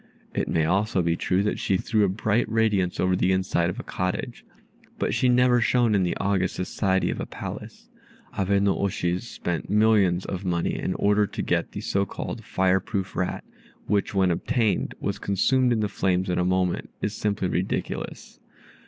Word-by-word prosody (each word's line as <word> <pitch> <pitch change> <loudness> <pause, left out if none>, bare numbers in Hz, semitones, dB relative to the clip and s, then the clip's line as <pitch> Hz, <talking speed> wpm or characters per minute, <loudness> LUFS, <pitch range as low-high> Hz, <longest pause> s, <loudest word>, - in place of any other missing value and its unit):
It - - -1
may 80 -1 +1
also 95 +2 +1
be 85 0 +1
true 95 +3 0
that 105 - -1
she 95 - +1
threw 110 +2 +1
a 100 - +3
bright 110 +3 0
radiance 105 -5 +1
over 90 0 +2
the 90 0 +2
inside 95 -2 +1
of 90 - -5
a - - -5
cottage, 90 0 -3 0.5
but - - -1
she 125 - +2
never 125 0 +4
shone 120 +1 +3
in 100 - +3
the 90 -2 0
august 95 -2 0
society 95 +1 0
of - - -5
a - - -4
palace. - - -8 0.5
Abe 100 +1 +1
no 100 -1 +3
oshi's 90 +1 -1
spending 90 +4 -2
millions 100 -5 +3
of 95 0 -4
money 85 -2 0
in 95 - -2
order 105 0 +2
to - - -5
get - - -1
the - - -5
so 100 0 0
called 115 - -6
fire 95 -3 +2
proof 95 0 -4
rat, 90 - -2 0.4
which, 100 0 0
when 95 -2 +3
obtained, 110 +4 0
was - - -3
consumed 125 +6 +2
in 115 -2 +1
the 105 - +1
flames 95 -1 0
in 90 - 0
a - - +2
moment, 90 -1 0
is 105 - -1
simply 105 -3 -1
ridiculous. 90 +1 -3
95 Hz, 190 wpm, -25 LUFS, 90-105 Hz, 0.5 s, never